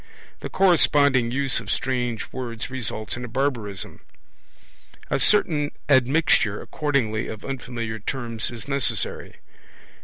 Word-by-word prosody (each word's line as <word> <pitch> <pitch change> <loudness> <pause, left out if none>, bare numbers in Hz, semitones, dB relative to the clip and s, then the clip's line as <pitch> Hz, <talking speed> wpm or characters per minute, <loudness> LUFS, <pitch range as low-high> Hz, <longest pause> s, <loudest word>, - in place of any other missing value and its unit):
The - - -6
corresponding 145 -9 +4
use 135 0 0
of 110 -3 -9
strange 120 -2 -2
words 120 -1 -5
results 110 -5 -2
in 120 - -6
a - - -5
barbarism. 115 -6 -3 1.1
A - - +2
certain 155 -8 +3 0.2
admixture, 130 -5 +3
accordingly, 125 -8 -1
of 110 - -7
unfamiliar 120 -4 -4
terms 115 0 -1
is 120 +1 -6
necessary. 140 -3 0
125 Hz, 115 wpm, -24 LUFS, 115-140 Hz, 1.1 s, corresponding